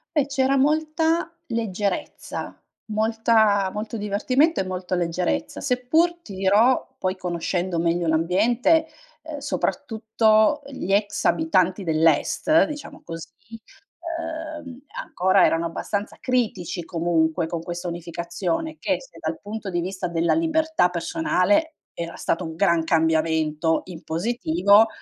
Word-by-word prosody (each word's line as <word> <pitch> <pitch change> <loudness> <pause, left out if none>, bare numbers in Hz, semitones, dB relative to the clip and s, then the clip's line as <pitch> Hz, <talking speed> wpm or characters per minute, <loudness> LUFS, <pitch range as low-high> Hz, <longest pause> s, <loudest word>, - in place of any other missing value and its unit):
Eh, 285 -2 +2
c'era 270 0 +1
molta 315 +4 +1
leggerezza 210 -4 -3 0.4
molta 220 -2 +2
molto 215 +2 -4
divertimento 255 +10 +1
e - - +2
molta 185 0 -4
leggerezza. 175 0 -1
Seppur 300 +7 +1
ti 200 - -10
dirò, 205 +7 +3
poi 185 0 -1
conoscendo 175 0 -2
meglio 170 +1 +1
l'ambiente, 220 - +2 0.4
ehm, 310 -2 -7
soprattutto 225 -2 +1
gli 265 -8 -5
ex 205 +1 +1
abitanti 190 - +2
dell'est 165 - +3
diciamo 295 -2 -8
così, 165 -1 -8 0.7
ehm, 320 -5 -6 0.2
ancora 185 - +3
erano 165 +1 +1
abbastanza 200 +5 -4
critici 205 -8 -1
comunque, 165 -1 0
con 165 0 -4
questa 175 +1 -5
unificazione 170 - -3
che - - -1
se - - -15
dal 320 - -4
punto 210 0 -6
di 175 - 0
vista 185 0 -3
della 170 0 +1
libertà 320 - +2
personale 205 - +1 0.2
era 170 0 -6
stato 165 - -1
un 160 0 -6
gran 170 -3 +2
cambiamento 160 -1 +1
in 175 -3 -10
positivo, 200 +2 +3
200 Hz, 120 wpm, -23 LUFS, 170-275 Hz, 0.7 s, dirò